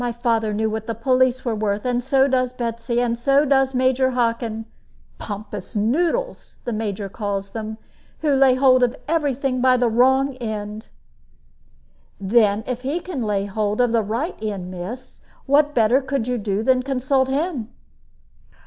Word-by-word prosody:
My 240 - -1
father 230 -2 0
knew 220 +1 0
what 220 0 -4
the 230 - -2
police 255 +2 +1
were 235 - 0
worth, 210 0 -2
and 245 -1 0
so 270 +1 +3
does 255 -2 0
Betsy, 235 0 -2
and 240 -1 +1
so 275 +4 +3
does 270 -1 +2
Major 260 +1 +2
Hockin. 230 -2 -1 0.5
'Pompous 205 -1 -7
noodles,' 335 - -1
the 240 - -3
Major 210 -2 -3
calls 200 -1 -4
them, 220 -1 -5 0.4
who 300 -2 +2
lay 265 -1 +5
hold 255 -1 +4
of 245 +1 +2
every 295 -4 +1
thing 255 -1 -1
by 255 0 +4
the 245 -1 +2
wrong 265 +3 +3
end." 215 -2 -5 1.3
"Then 205 +1 +2
if 250 -1 -4
he 280 +6 -2
can 350 -7 -5
lay 205 -3 0
hold 205 +1 -2
of 245 -2 +3
the 230 -1 +3
right 230 - -3
end, 195 -4 -4
miss, 185 +8 -8 0.2
what 295 +1 +3
better 235 +4 +4
could 265 -3 -2
you 250 -1 -1
do 205 0 -1
than 255 +1 +3
consult 265 0 0
him?" 275 -5 -2
245 Hz, 165 wpm, -22 LUFS, 220-265 Hz, 1.3 s, lay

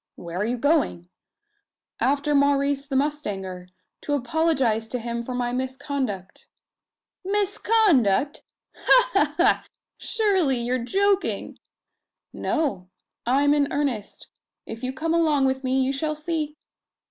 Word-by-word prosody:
"Where 170 0 -7
are 205 - 0
you 245 +2 -1
going?" 275 - +1 0.9
"After 285 +2 +1
Maurice 280 0 +2
the 275 - -3
mustanger 200 -11 -2 0.3
to 290 - -3
apologise 260 -5 +1
to 250 - -3
him 235 0 -4
for 250 +1 -5
my 245 -1 -1
misconduct." 260 -6 -4 0.8
"Misconduct! 385 - +2 0.3
Ha - - +4
ha 295 -6 +2
ha! 355 - +3 0.3
Surely 385 - +1
you 240 +1 -2
are 255 - +1
joking?" 390 +10 0 0.7
"No. 265 - -2 0.4
I'm 285 +3 +4
in 285 -1 +1
earnest. 265 -8 -3 0.4
If 225 - -8
you 255 0 -2
come 320 +5 -2
along 310 -5 +3
with 265 0 0
me, 260 +1 +1
you 265 +1 0
shall 305 +2 -2
see!" 305 -1 -3
280 Hz, 125 wpm, -24 LUFS, 245-310 Hz, 0.9 s, Ha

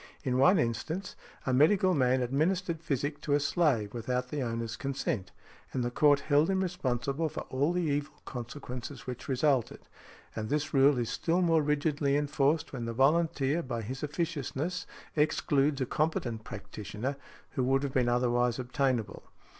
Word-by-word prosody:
In 130 -2 0
one 180 +8 +6
instance, 160 - -2 0.3
a 130 - +1
medical 185 +7 +4
man 130 -3 +2
administered 165 +6 0
physic 145 -1 -2
to 145 -2 +1
a - - +3
slave 140 - +1
without 125 +2 -2
the 145 0 -3
owner's 115 -1 -3
consent, 130 -7 -2 0.4
and 130 - 0
the 120 - -1
court 145 +2 +4
held 150 +2 +3
him 190 0 +1
responsible 145 -3 -1
for - - -5
all 140 +5 +1
the 180 0 0
evil 145 -1 -1
consequences 125 +1 -7
which 125 -1 -6
resulted; 135 -2 +1 0.5
and 110 -1 -3
this 150 0 -1
rule 135 0 +5
is 120 -2 -1
still 175 +2 +1
more 165 -2 +4
rigidly 145 -1 +1
enforced 145 +1 +1
when 120 -3 -4
the 115 - -3
volunteer 150 +2 +2
by 120 -6 -4
his 130 +5 -5
officiousness 155 +2 -3 0.3
excludes 145 -2 +2
a - - +2
competent 125 -7 -1
practitioner 105 +6 -5 0.4
who 130 - -1
would 135 +2 +2
have 140 -2 -3
been 125 -2 +2
otherwise 120 -1 +2
obtainable. 130 -2 -1
140 Hz, 160 wpm, -30 LUFS, 125-155 Hz, 0.5 s, one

